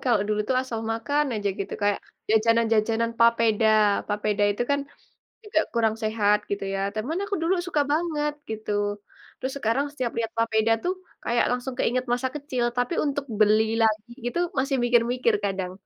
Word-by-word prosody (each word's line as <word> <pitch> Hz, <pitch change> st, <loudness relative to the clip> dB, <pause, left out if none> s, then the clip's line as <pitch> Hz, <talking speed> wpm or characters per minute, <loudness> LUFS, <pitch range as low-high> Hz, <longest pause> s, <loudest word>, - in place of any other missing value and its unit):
kalau 240 Hz, -5 st, +3 dB
dulu 210 Hz, 0 st, 0 dB
itu 255 Hz, -, 0 dB
asal 235 Hz, -4 st, -4 dB
makan 285 Hz, +6 st, 0 dB
aja 205 Hz, -1 st, -1 dB
gitu. 195 Hz, -, -4 dB
Kayak 205 Hz, -1 st, +2 dB, 0.3 s
jajanan-jajanan 225 Hz, 0 st, +2 dB
papeda. 230 Hz, -2 st, +4 dB, 0.4 s
Papeda 210 Hz, 0 st, 0 dB
itu 205 Hz, +4 st, -1 dB
kan 285 Hz, 0 st, +2 dB, 0.6 s
juga 405 Hz, -7 st, +1 dB
kurang 225 Hz, -2 st, +2 dB
sehat 210 Hz, -1 st, +2 dB
gitu 200 Hz, -1 st, -2 dB
ya, -, -, -1 dB, 0.2 s
teman 255 Hz, +11 st, -2 dB
aku 405 Hz, 0 st, -3 dB
dulu 335 Hz, +3 st, +2 dB
suka 305 Hz, -5 st, +1 dB
banget 300 Hz, -2 st, 0 dB, 0.2 s
gitu. 220 Hz, -1 st, -5 dB, 0.7 s
Terus 260 Hz, -, -3 dB
sekarang 255 Hz, +3 st, +1 dB
setiap 255 Hz, -5 st, -3 dB
lihat 225 Hz, -1 st, -1 dB
papeda 225 Hz, 0 st, +2 dB
tuh 360 Hz, +1 st, 0 dB, 0.3 s
kayak 235 Hz, 0 st, +2 dB
langsung 250 Hz, +1 st, -2 dB
keingat 255 Hz, +1 st, +1 dB
masa 250 Hz, +2 st, 0 dB
kecil, 275 Hz, -4 st, -2 dB
tapi 245 Hz, +6 st, 0 dB
untuk 285 Hz, -1 st, -1 dB
beli 215 Hz, 0 st, +5 dB, 0.2 s
lagi 220 Hz, +1 st, +1 dB
gitu 245 Hz, -, -2 dB, 0.2 s
masih 270 Hz, +1 st, +1 dB
mikir-mikir 240 Hz, -1 st, +2 dB
kadang. 190 Hz, -2 st, -2 dB
230 Hz, 165 wpm, -25 LUFS, 215-265 Hz, 0.7 s, beli